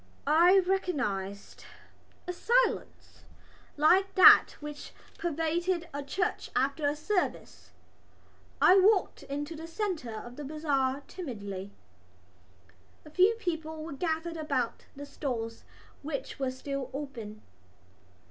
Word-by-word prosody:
I 340 +6 +6
recognised 245 - -2 0.6
a 360 - -2
silence - - 0 0.6
like 380 +6 +4
that 370 - +8
which 295 -1 -8 0.3
pervades 335 +2 -1 0.2
a 285 - -3
church 355 +6 -2
after 280 +3 +1
a 290 - -2
service. 360 +5 -3 0.9
I 380 +2 +7
walked 395 0 +3
into 290 +3 -5
the 325 +1 -8
centre 330 - -3
of 240 +3 -9
the 295 - -6
bazaar 280 -2 -1
timidly. 205 - -6 1.4
A 305 - -13
few 375 +7 +4
people 320 -6 -4
were 320 - -6
gathered 325 +2 -2
about 270 -7 -2
the 285 +1 -8
stalls 240 -6 -5 0.4
which 280 -2 -5
were 265 -1 0
still 265 0 -5
open. 230 -7 -7
300 Hz, 110 wpm, -29 LUFS, 270-350 Hz, 1.4 s, that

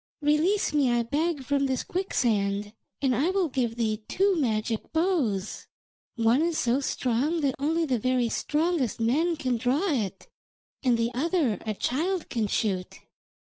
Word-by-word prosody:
Release 310 +7 +2
me, 285 -4 +3
I 240 0 +2
beg, 295 +4 -1
from 275 +1 +1
this 260 -1 -1
quicksand, 210 - -1 0.3
and 260 -2 +3
I 290 +9 +2
will 375 -3 +1
give 245 -4 -1
thee 220 -2 -1
two 390 +1 +2
magic 225 -6 -1
bows. 295 - 0 0.5
One 230 +3 +3
is 335 -1 0
so 245 +3 +2
strong 275 +4 0
that 275 -3 +1
only 325 +4 +1
the 255 -5 0
very 255 +1 +1
strongest 300 - 0
men 300 +10 +2
can 255 -5 -1
draw 275 - +1
it, 205 -8 -2 0.5
and 250 -3 +2
the 230 +1 0
other 290 - 0
a 215 - -1
child 335 - -1
can 225 -4 -1
shoot.' 190 -3 -2
260 Hz, 155 wpm, -27 LUFS, 230-320 Hz, 0.5 s, me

